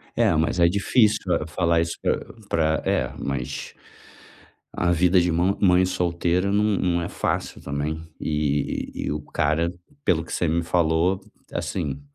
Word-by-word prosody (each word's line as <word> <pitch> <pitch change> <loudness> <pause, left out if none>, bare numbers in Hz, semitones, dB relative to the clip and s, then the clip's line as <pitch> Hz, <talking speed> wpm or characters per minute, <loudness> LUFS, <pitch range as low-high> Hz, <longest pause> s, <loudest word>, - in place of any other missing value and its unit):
É, - - +3
mas 80 +3 +1
é 85 - +6
difícil, 100 +1 +2
hã, 75 - 0
falar 85 0 +1
isso 85 0 -3
pra - - +1 0.3
pra 80 -1 +1
é, - - 0
mas 70 0 -4 1.0
a 85 0 +1
vida 90 +2 +4
de 85 0 +1
mã 90 +4 +2
mãe 90 -1 +5
solteira 90 +1 0
não 105 +1 +2 0.2
não 85 -1 +1
é 85 - -4
fácil - - -2
também, 75 +3 -3 0.2
eh, - - -6
e 75 -2 -1 0.2
e - - -1
o 75 0 -3
cara, 80 +4 0 0.3
pelo 85 -1 +2
que - - -11
você 85 - 0
me 85 +2 +1
falou, 85 +2 +2 0.3
assim, 140 - -3
85 Hz, 165 wpm, -24 LUFS, 80-90 Hz, 1.0 s, é